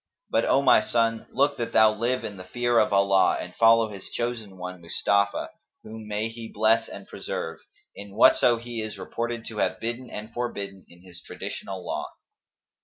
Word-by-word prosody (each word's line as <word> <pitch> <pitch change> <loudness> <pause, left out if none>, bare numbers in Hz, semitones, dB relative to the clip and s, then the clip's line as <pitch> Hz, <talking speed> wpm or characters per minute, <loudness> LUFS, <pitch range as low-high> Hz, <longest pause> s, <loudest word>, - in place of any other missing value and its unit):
But, - - +2
O 135 - +3
my 125 -5 +6
son, 115 0 0
look 140 +2 +2
that 115 - -3
thou 110 -1 +6
live 120 +4 -1
in 100 - -6
the 90 - -8
fear 120 +5 +1
of - - +2
Allah 100 -1 +4
and 90 - -7
follow 115 +1 +5
His 100 -2 -9
Chosen 115 -5 -4
One, 90 0 -7
Mustafa, 100 +4 0 0.3
(whom 110 0 -9
may 105 +1 -1
He 115 0 -9
bless 110 +1 +2
and - - -10
preserve!) 80 - -5 0.3
in 100 0 -11
whatso 120 +2 +5
he 115 0 -6
is 110 0 -6
reported 120 -1 -4
to 110 -2 -6
have 95 0 0
bidden 120 +3 -4
and 110 +2 -8
forbidden 100 -6 -5
in 85 +1 -18
his 90 -2 -14
traditional 95 -2 -7
law. - - -3
110 Hz, 180 wpm, -26 LUFS, 100-115 Hz, 0.3 s, my